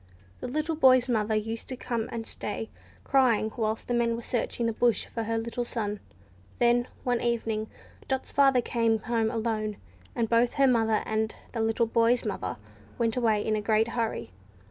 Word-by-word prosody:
The - - -5
little 305 +5 -1
boy's 255 -4 +5
mother 220 -3 +1
used 225 +1 -3
to 260 - -4
come 235 -3 -3
and 230 -1 -4
stay, 220 +1 -5 0.3
crying, 240 -6 +3
whilst 220 -1 -1
the 245 - -2
men 235 -1 +2
were 235 - -6
searching 235 0 -2
the 230 - 0
bush 235 +1 +2
for 230 -1 -4
her 225 +1 -1
little 235 +2 -2
son. 210 -4 -3 0.6
Then, 240 0 +3 0.2
one 245 -1 0
evening, 225 -2 -1 0.4
Dot's 265 -1 -2
father 270 -3 +4
came 230 -1 +1
home 225 -1 0
alone, 220 -2 -2 0.4
and 230 -1 +1
both 235 +2 +3
her 275 - +4
mother 225 -4 +3
and 220 0 -1 0.2
the 230 - -1
little 225 +1 +2
boy's 230 +1 +2
mother 210 - -3 0.4
went 230 -1 +1
away 220 -4 +1
in 215 - +1
a 215 - -1
great 220 +2 +2
hurry. 225 - -2
230 Hz, 180 wpm, -28 LUFS, 220-240 Hz, 0.6 s, boy's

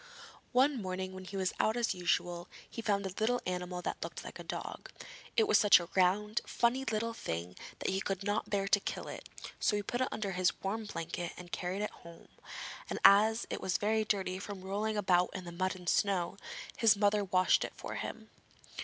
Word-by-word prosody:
One 265 0 +3
morning 185 0 -3
when 185 0 -8
he 195 +1 -6
was 190 -1 0
out 220 +2 +2
as 240 -1 +1
usual, 175 -1 0 0.2
he 230 - -6
found 200 -3 +1
a 190 - -3
little 245 +3 +2
animal 180 0 -3
that - - -3
looked - - -5
like - - -9
a - - -6
dog. - - -6 0.5
It 445 -2 +5
was - - +6
such 205 -3 +8
a 170 0 -7
round, 205 +4 +3
funny 245 +3 +1
little 225 0 -1
thing 85 - -4 0.2
that - - -1
he 190 0 0
could 195 0 -2
not 205 +1 -1
bear 195 -1 0
to 205 - +5
kill - - -4
it, - - -8 0.3
so 210 - +2
he 205 - -1
put 245 +5 -2
it 255 - +2
under 205 -2 -2
his 185 -1 +1
warm 215 +3 -2
blanket, 170 -3 -4
and 175 -1 -10
carried 185 +3 -2
it 210 - -2
home, 170 0 -14 0.6
and - - -2
as 220 +3 +7
it - - -3
was 185 - +1
very 220 +1 +2
dirty 190 -3 -1
from 200 -1 -6
rolling 210 +3 -1
about 180 -3 +3
in 185 - -5
the 175 - -6
mud 185 +2 -1
and 180 -1 -11
snow, 195 -3 +2 0.4
his 225 -2 +5
mother 205 0 +3
washed 185 -1 +3
it - - -5
for - - -6
him. 220 -1 -6
195 Hz, 210 wpm, -33 LUFS, 185-215 Hz, 0.6 s, such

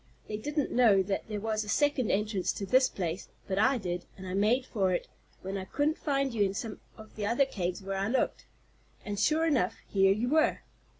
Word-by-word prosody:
They 210 - -3
didn't 295 +5 -2
know 215 -6 +5
that 195 +1 -3
there 210 -1 -3
was 215 0 -1
a 210 - -9
second 290 -1 +2
entrance 205 -2 0
to 200 - -4
this 255 +5 +4
place, 175 -1 -4 0.2
but 195 0 -1
I 260 +5 +4
did, 180 -4 -4
and 190 - -9
I 185 - -5
made 220 +6 +2
for 195 -7 0
it, 175 - -1 0.4
when 195 +1 -3
I 190 - -6
couldn't 295 - 0
find 275 -3 0
you 220 - -1
in 195 0 0
some 220 0 -5 0.2
of 215 -1 -13
the 205 -1 -2
other 240 +5 +3
caves 185 -6 -3
where 195 0 -3
I 195 - 0
looked. 255 +4 -1 0.6
And, 205 -1 -3
sure 315 +7 +3
enough, 265 - +1
here 195 -1 +4
you 215 +5 0
were." 310 +2 +2
210 Hz, 220 wpm, -30 LUFS, 195-255 Hz, 0.6 s, know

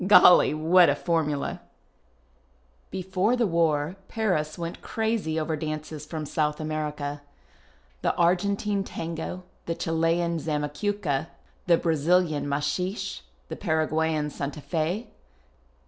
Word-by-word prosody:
Golly, 180 -6 +8
what 170 +3 +5
a 140 - +3
formula! 150 -3 -1 1.3
Before 190 +4 0
the 245 -2 +2
war 165 -1 +1
Paris 180 -9 -1
went 170 -1 -5
crazy 220 -8 -1
over 160 0 -1
dances 155 0 -5
from 155 -1 -4
South 150 0 0
America: 150 -2 -3 0.8
the - - +1
Argentine 200 +3 +1
fango, 165 +1 -5 0.2
the 165 - -1
Chilean 165 +1 +1
zamacucca, 150 +1 -1 0.4
the 170 -1 +6
Brazilian 160 -2 +2
incuiixc, 150 - -2 0.3
tiie - - -5
Paraguayan 160 -1 +1
santafi. 155 - -2
160 Hz, 100 wpm, -26 LUFS, 150-180 Hz, 1.3 s, Golly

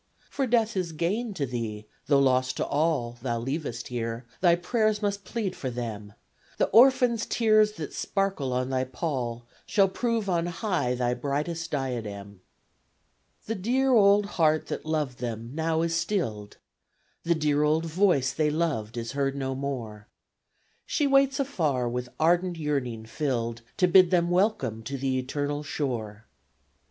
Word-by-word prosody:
For 270 -2 -1
death 230 -2 +2
is 180 -3 -2
gain 200 +7 -1
to 145 - -1
thee, 115 -4 -4 0.2
tho' 145 - +4
loss 130 -1 +3
to - - -2
all 140 -6 0
Thou 120 -2 -1
leavest 120 -1 -4
here. 115 0 -4
Thy 175 -2 +5
prayers 215 +4 +1
must 200 -2 -2
plead 205 -6 -3
for 130 - -4
them. 110 -4 -6 0.4
The - - +2
orphans' 250 -2 +5
tears 215 -2 +3
that 160 -8 -7
sparkle 195 -10 -1
on 130 +1 -1
thy 130 -1 +1
pall 125 -3 -3 0.2
Shall 195 -2 +4
prove 230 +1 -1
on 175 -2 +1
high 175 - -1
thy 125 0 0
brightest 150 +6 -3
diadem. 105 -9 -4 1.0
The 225 - -2
dear 255 +6 +1
old 205 -2 +5
heart 155 -5 +1
that - - -5
loved 150 -5 -1
them 115 -1 -5
now 160 +1 0
is 165 0 0
stilled, 160 - -2 0.6
The 170 0 +1
dear 150 -2 +1
old 155 +2 +2
voice 165 -6 +2
they 155 -1 +1
loved 150 -9 -1
is 115 -1 -4
heard 140 0 -1
no 135 -1 -2
more; 120 -6 -5 0.8
She 295 - +1
waits 275 0 +3
afar 155 - 0
with 125 +1 -3
ardent 175 +2 +2
yearning 135 -8 -2
filled 115 -3 -2 0.2
To 185 -3 +4
bid 185 0 +6
them 175 -1 +2
welcome 175 - +1
to 135 +5 -5
the 130 -1 0
eternal 145 +3 -2
shore! 115 -8 -4
150 Hz, 155 wpm, -27 LUFS, 125-185 Hz, 1.0 s, bid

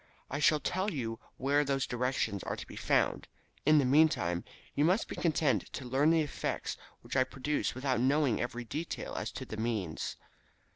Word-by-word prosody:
I 145 - -1
shall 155 0 +4
tell 185 +8 -1
you 115 - -3 0.2
where 145 +3 +2
those 135 -1 0
directions 125 -5 -1
are - - -3
to - - -7
be - - -11
found. - - +1 0.4
In 155 0 +7
the 140 - +4
meantime, 125 - +3 0.3
you 145 - +2
must 185 +7 +3
be - - -6
content 150 - +1
to 130 - -5
learn 135 +5 +3
the 165 -1 +4
effects 145 - -3 0.3
which 120 +2 -7
I 130 - +5
produce 135 +3 -2
without 130 -1 0
knowing 135 -1 +2
every 120 0 -3
detail 155 +8 -4
as - - -3
to - - -5
the 110 - -7
means." 110 -8 -2
135 Hz, 185 wpm, -32 LUFS, 120-150 Hz, 0.4 s, In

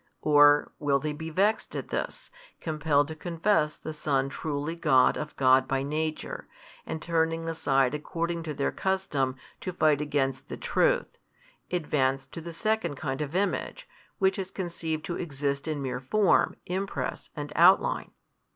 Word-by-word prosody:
or 145 -1 +6
will 145 -2 +2
they 150 +2 -3
be 160 +2 -6
vexed 200 +7 +1
at - - -4
this, - - -4 0.3
compelled 150 -2 +1
to 160 - -5
confess 165 -1 +1
the 155 - -7
Son 140 -3 0
truly 150 +2 -3
God 130 -6 +4
of 150 0 -5
God 130 0 +5
by 135 0 0
Nature, 155 +2 -3 0.4
and 160 - -3
turning 165 0 0
aside 135 -5 +1
according 170 +3 -2
to 160 -2 -4
their 140 - 0
custom 170 -9 -1 0.2
to 185 - -4
fight 155 -4 +3
against 135 -3 -1
the - - -5
truth, - - +1 0.5
advance 135 -6 0
to 165 +5 -9
the 170 +1 -7
second 215 -3 -1
kind 135 0 -3
of 150 +2 -4
image, 205 - -1 0.3
which 190 +1 +2
is 190 -1 -3
conceived 170 -5 -4
to 175 - -3
exist 140 -3 -2
in 150 -3 -2
mere 130 -1 -2
form, 195 +10 +3
impress 190 +2 -3
and - - -5
outline? - - +4
155 Hz, 155 wpm, -28 LUFS, 140-170 Hz, 0.5 s, or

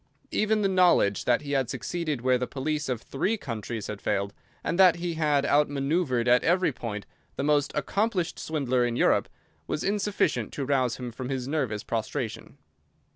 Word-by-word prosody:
Even 215 0 +1
the - - +4
knowledge 180 - +3
that 125 +4 +2
he 140 - -5
had 135 -4 +1
succeeded 150 - -3
where 125 0 +3
the 125 - -2
police 150 +1 -2
of 120 -3 -2
three 190 +11 -1
countries 115 - -5
had 105 -1 -6
failed, 100 0 -1 0.3
and 170 - -2
that 185 -3 +7
he 175 0 -3
had 150 -3 +1
outmanœuvred 145 -3 +1
at 125 0 +5
every 175 -1 +3
point 105 -5 -5 0.3
the - - -2
most 145 -1 +2
accomplished 185 +4 -1
swindler 130 -5 0
in 120 -1 0
Europe, - - +2 0.4
was - - -2
insufficient 200 - 0
to 140 - -3
rouse 130 -3 +1
him 125 -2 -5
from 125 +2 -6
his 130 -2 -3
nervous 130 -8 -1
prostration. 115 +1 -4
140 Hz, 175 wpm, -27 LUFS, 120-165 Hz, 0.4 s, that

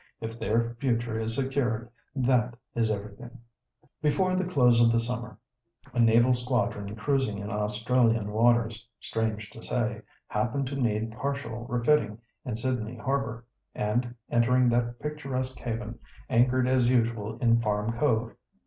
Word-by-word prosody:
"If 115 +1 -6
their 115 +1 0
future 115 -3 0
is 110 0 -1
secured, 130 -4 -1 0.3
that 125 -2 +2 0.2
is 115 -2 +1
everything." 105 +4 -5 0.6
Before 185 +5 +2
the 185 0 0
close 125 -9 +4
of 115 0 +6
the 115 - +3
summer, 120 0 -2 0.6
a 125 - -1
naval 120 +2 +5
squadron 120 -5 -1
cruising 130 -2 0
in 100 +1 -5
Australian 110 +1 +1
waters, 115 -1 +2
strange 110 -1 -3
to 115 - -11
say, 120 -2 -2 0.2
happened 125 +6 -1
to 140 - -4
need 110 -4 0
partial 120 -2 -4
refitting 120 -3 +2 0.3
in 120 - -3
Sydney 120 -1 -2
Harbour, 125 -2 -2 0.3
and, 120 +3 -1 0.2
entering 125 +1 +4
that 120 0 0
picturesque 135 -3 -4
haven, 115 -1 -4 0.3
anchored 125 +1 +3
as 130 -2 +3
usual 115 -3 0
in 115 -2 +3
Farm 105 0 0
Cove. 115 -4 +1
120 Hz, 140 wpm, -28 LUFS, 110-125 Hz, 0.6 s, of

